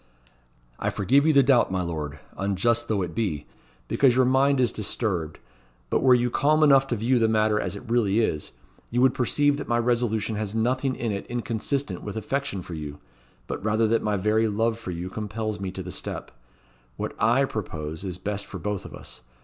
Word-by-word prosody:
"I - - 0
forgive 135 - +3
you 160 - +5
the 140 -1 +6
doubt, 125 -6 +4
my 95 -1 0
Lord 75 -3 -4 0.2
unjust 110 +5 +1
though 100 -4 0
it 85 -2 -5
be 90 -10 -2 0.4
because 130 -3 +3
your 130 0 +4
mind 135 +2 +3
is 125 -2 +3
disturbed; 95 -7 -2 0.5
but - - +2
were 130 -2 +6
you 120 0 +1
calm 155 +4 +3
enough 135 -2 +6
to 120 - -1
view 120 +3 +2
the 115 - +3
matter 110 -1 +2
as - - -3
it 110 +5 -9
really 115 -3 +2
is, 80 -9 -1 0.4
you 120 - -1
would 130 -1 +5
perceive 145 +3 +2
that 145 - -6
my 120 - +2
resolution 115 -3 0
has 105 0 -3
nothing 130 +3 +1
in 115 -2 -2
it 100 -1 -4
inconsistent 120 -2 -2
with 105 0 -6
affection 125 -4 -2
for 85 - -8
you; 75 -2 -6 0.5
but - - -5
rather 110 +1 +2
that 115 - +2
my 105 -1 0
very 110 +3 +2
love 110 +2 0
for 105 - -7
you 85 0 -4
compels 110 +1 -4
me 95 -1 -3
to 95 0 -6
the 90 - -7
step. - - -5 0.7
What - - -3
I 120 +5 +4
propose 80 - -5
is 90 -3 -4
best 100 +2 -4
for - - -7
both 105 -2 -3
of - - -9
us. - - -10
110 Hz, 205 wpm, -25 LUFS, 100-125 Hz, 0.7 s, the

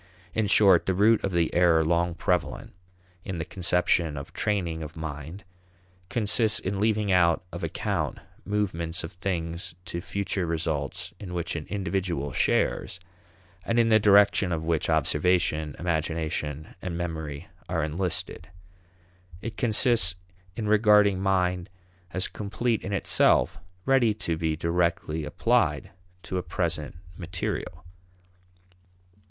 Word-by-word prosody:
In 110 -2 +1
short, 95 -3 +5
the 95 - +1
root 110 +4 +4
of 100 - -1
the 85 -2 +1
error 85 -2 +4
long 85 +1 +1
prevalent 90 -1 -1 0.5
in 95 - -5
the 80 - -3
conception 90 -3 +1
of 70 - -8
training 85 -6 -1
of 80 0 -7
mind 80 +4 -7 0.7
consists 110 +1 +2
in 95 +1 -3
leaving 105 -1 +1
out 85 -1 +3
of - - -7
account - - -2 0.3
movements 90 -5 -2
of 80 - -6
things 85 -2 -4
to 85 - -4
future 100 -2 -2
results 80 -3 -3
in 90 -3 -7
which 85 -1 -2
an 80 -2 -5
individual 95 -7 -2
shares, 90 - 0 0.6
and 115 - -1
in 115 -1 +4
the 110 -1 +6
direction 100 -2 +5
of 80 -1 -2
which 80 -1 0
observation, 80 0 +1
imagination, 80 -2 -2
and 85 -2 -4
memory 80 -4 -5 0.2
are 85 -3 0
enlisted. 90 +2 -3 0.9
It 115 +2 -6
consists 110 -5 +3 0.4
in 110 0 -3
regarding 105 -2 +5
mind 90 -2 +1 0.4
as 95 0 0
complete 110 +3 -2
in - - -4
itself, 100 - +3 0.3
ready 130 -5 +3
to 85 -5 -2
be 80 -1 -1
directly 85 -1 -1
applied 75 - +1 0.3
to 95 - -3
a - - -2
present 80 -4 -3 0.2
material. 85 -1 -5
90 Hz, 130 wpm, -26 LUFS, 80-100 Hz, 0.9 s, the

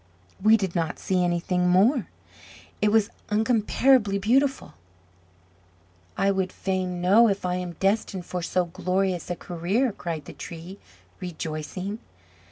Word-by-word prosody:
"We 215 +2 +6
did 190 -5 -3
not 165 -3 -1
see 185 -1 0
anything 180 +1 +1
more: 210 +8 +3 0.7
it 210 - +3
was 220 -1 +3 0.2
incomparably 220 0 +3
beautiful." 260 +7 +1 1.4
"I 195 +1 +3
would 190 -1 -1
fain 185 -2 -2
know 205 +6 +6
if 195 -2 -1
I 180 0 0
am 180 -1 -4
destined 195 0 -1
for 180 - -4
so 180 +1 0
glorious 185 +1 -1
a 175 - -1
career," 185 +10 -1
cried 165 -6 -5
the - - -9
Tree, 180 +2 -9 0.4
rejoicing. 180 +4 -5
190 Hz, 130 wpm, -25 LUFS, 180-210 Hz, 1.4 s, We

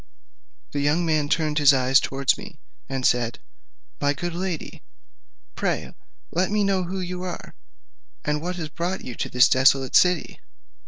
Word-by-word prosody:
The 145 - -2
young 150 +5 +1
man 155 -3 +1
turned 155 -1 +1
his 145 -1 +6
eyes 130 +1 +4
towards 135 -1 +1
me, - - -11 0.3
and 135 -1 -2
said, 120 -2 +1 0.6
"My 145 0 +2
good 175 +4 -4
lady, 180 -2 -4 0.7
pray - - -2 0.4
let 180 +2 +1
me 210 0 +1
know 195 -2 +1
who 190 +2 -4
you 180 0 -4
are, 180 -2 -6 0.7
and 150 0 0
what 180 +2 -3
has 160 -3 -5
brought 175 +5 -4
you 125 - -5
to - - -4
this 125 0 +5
desolate 130 0 +3
city? 180 -3 +3
155 Hz, 160 wpm, -24 LUFS, 135-180 Hz, 0.7 s, his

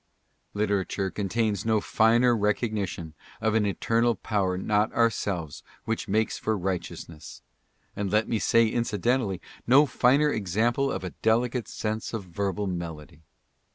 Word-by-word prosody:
''' - - -45
1 105 - -3
Literature 100 -2 0
contains 105 0 -1
no 110 -1 +2
finer 120 +4 +3
recognition 105 -6 -1 0.3
of 110 0 0
an 110 -2 +2
"Eternal 115 +4 +1
Power 95 -4 -1
not 105 +3 +1
ourselves 100 -9 0 0.2
which 115 0 -2
makes 110 +2 0
for 110 -1 -1
righteousness," 85 -4 -5 0.5
and 100 -1 -2
let 110 +1 +2
me 115 - 0
say 115 +2 +4
in 115 +2 0
cidentally, 110 -2 0 0.3
no 135 +5 +7
finer 140 +2 +3
example 115 +7 0
of - - -4
a 90 - -4
delicate 120 +1 +1
sense 110 +1 -4
of 110 - -4
verbal 100 +2 -3
melody. 85 -4 -6
105 Hz, 145 wpm, -27 LUFS, 95-115 Hz, 0.5 s, no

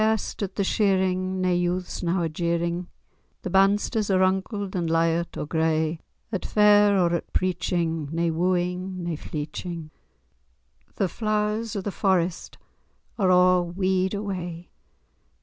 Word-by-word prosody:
In 215 - +4
hair'st, 220 -1 -1
at 195 -2 -3
the 200 - 0
shearing, 190 -2 +1
nae 185 0 +2
youths 175 +1 -1
now 175 +1 0
are 165 - +1
jeering, 170 +2 -1 0.6
The 185 - -4
bandsters[#] 205 +3 +2
are 190 - +3
runkled,[#] 190 +1 0
and 170 -3 -1
lyart[#] 165 +1 +1
or - - -3
gray; 160 0 0 0.3
At 195 - -2
fair, 205 -1 +5
or 175 -2 +2
at 170 - -3
preaching, 170 -4 -1
nae 165 0 0
wooing, 180 +2 -1
nae 170 -1 -2
fleeching;[#] 155 +2 -6 1.0
The 195 - +1
Flowers 215 +2 -1
of 200 - -3
the 205 - -3
Forest 180 -2 0 0.6
are 190 -2 +3
a' 180 0 +5
wede 185 +2 0
away. 180 -4 -5
185 Hz, 140 wpm, -25 LUFS, 170-195 Hz, 1.0 s, fair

